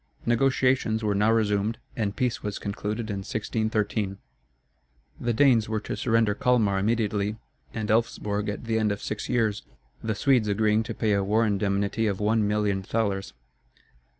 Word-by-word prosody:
Negotiations 125 -2 +2
were 105 -1 +1
now 105 +2 +3
resumed 110 0 +1 0.2
and 105 -3 -2
peace 125 -2 -1
was 105 -1 -4
concluded 105 +2 -4
in 100 - -3
1613. 105 -1 -2 1.0
The 120 - 0
Danes 115 -3 +4
were 110 -1 0
to - - -4
surrender 115 -3 +2
Calmar 105 -4 +2
immediately 105 -1 0 0.4
and 110 -2 -4
Elfsborg 105 -2 0
at 105 - -5
the 110 -1 0
end 110 -1 +1
of 100 - -3
six 105 - -4
years; 110 -4 +1 0.4
the 110 -1 -1
Swedes 125 0 +3
agreeing 105 +1 +2
to - - -5
pay 110 -2 +1
a 100 -1 +2
war 110 +4 +2
indemnity 100 +1 0
of 100 -2 -1
one 105 0 +2
million 105 -2 0
thalers. 95 -5 -2
105 Hz, 155 wpm, -26 LUFS, 100-115 Hz, 1.0 s, Danes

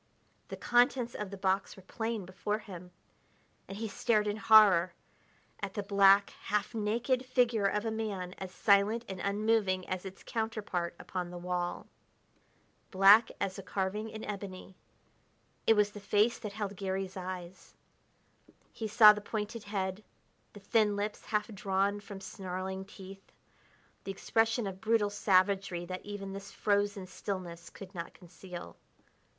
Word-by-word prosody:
The - - -7
contents 245 0 +2
of 210 -2 -5
the 200 - -7
box 190 0 0
were 190 - -13
plain 225 0 -3
before 185 +3 -2
him 185 -5 -10 0.8
and 195 - -7
he 225 +1 -3
stared 210 +1 +1
in 210 0 -1
horror 200 -6 +6 0.6
at 200 -1 -5
the 205 - -2
black, 200 0 +5
half 210 +3 -1
naked 235 +4 0
figure 245 -5 +2
of 210 +2 -1
a 225 - -1
man 200 -5 -4
as 190 -1 -6
silent 210 +4 +3
and 190 -1 -6
unmoving 200 -2 +1
as 185 -1 -3
its 190 -1 -9
counterpart 215 -7 -3
upon 180 -2 -5
the 175 - -8
wall. 175 0 -3 1.0
Black 200 +4 +7
as 195 -1 -2
a - - -5
carving 195 +3 -3
in 220 0 -8
ebony, 195 -2 -7 0.9
it 225 - +7
was 210 -1 +3
the 205 - -9
face 210 +3 +2
that 210 -3 -6
held 205 -1 -4
Garry's 190 0 -3
eyes. 185 -1 -7 1.0
He 220 - -4
saw 215 -1 +9
the 210 - -6
pointed 215 +1 -4
head, 195 0 -3 0.5
the 205 - -11
thin 210 +1 +2
lips 205 +1 -4
half 210 -1 0
drawn 200 0 0
from 200 -1 -9
snarling 190 0 -5
teeth, 195 -1 -12 0.7
the 195 - -4
expression 225 +3 +1
of 190 -1 -6
brutal 220 -2 +2
savagery 190 -2 +2
that 185 +1 -6
even 200 -1 -6
this 195 0 -8
frozen 205 -1 0
stillness 180 -3 -6
could 195 -1 -11
not 170 -2 -7
conceal. 175 - -10
200 Hz, 150 wpm, -31 LUFS, 190-215 Hz, 1.0 s, saw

